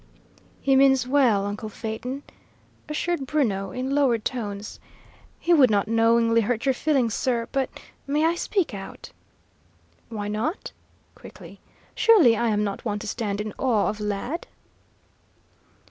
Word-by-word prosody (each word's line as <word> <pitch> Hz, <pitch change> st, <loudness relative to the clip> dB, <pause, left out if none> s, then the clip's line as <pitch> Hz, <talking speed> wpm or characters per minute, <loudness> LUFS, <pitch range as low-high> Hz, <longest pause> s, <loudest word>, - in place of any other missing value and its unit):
"He 270 Hz, -1 st, +2 dB
means 265 Hz, -2 st, +4 dB
well, 250 Hz, -8 st, +3 dB
uncle 205 Hz, +2 st, -5 dB
Phaeton," 240 Hz, +6 st, -5 dB, 0.7 s
assured 300 Hz, -2 st, -2 dB
Bruno, 205 Hz, -11 st, 0 dB
in 255 Hz, +8 st, -3 dB
lowered 255 Hz, -6 st, +2 dB
tones. 210 Hz, -5 st, -4 dB, 0.6 s
"He 345 Hz, -, +2 dB
would 275 Hz, -6 st, +6 dB
not 205 Hz, -1 st, +1 dB
knowingly 230 Hz, 0 st, +3 dB
hurt 225 Hz, +2 st, -1 dB
your 265 Hz, -, +3 dB
feelings, 260 Hz, -5 st, +1 dB
sir, 235 Hz, -3 st, -1 dB
but 270 Hz, -2 st, 0 dB, 0.4 s
may 295 Hz, +3 st, +1 dB
I 330 Hz, -, +3 dB
speak 345 Hz, -, -1 dB
out?" 195 Hz, -1 st, -9 dB, 1.0 s
"Why 210 Hz, -3 st, -4 dB
not?" 220 Hz, -, -3 dB, 0.4 s
quickly. -, -, -13 dB, 0.3 s
"Surely 370 Hz, -, +5 dB
I 235 Hz, +2 st, 0 dB
am 210 Hz, -1 st, +1 dB
not 200 Hz, -1 st, -4 dB
one 210 Hz, -3 st, -2 dB
to 205 Hz, -, -7 dB
stand 205 Hz, -2 st, -3 dB
in 210 Hz, 0 st, -4 dB
awe 220 Hz, -8 st, +2 dB
of, 215 Hz, -, -5 dB
lad?" 210 Hz, -, -3 dB
235 Hz, 140 wpm, -24 LUFS, 210-275 Hz, 1.0 s, would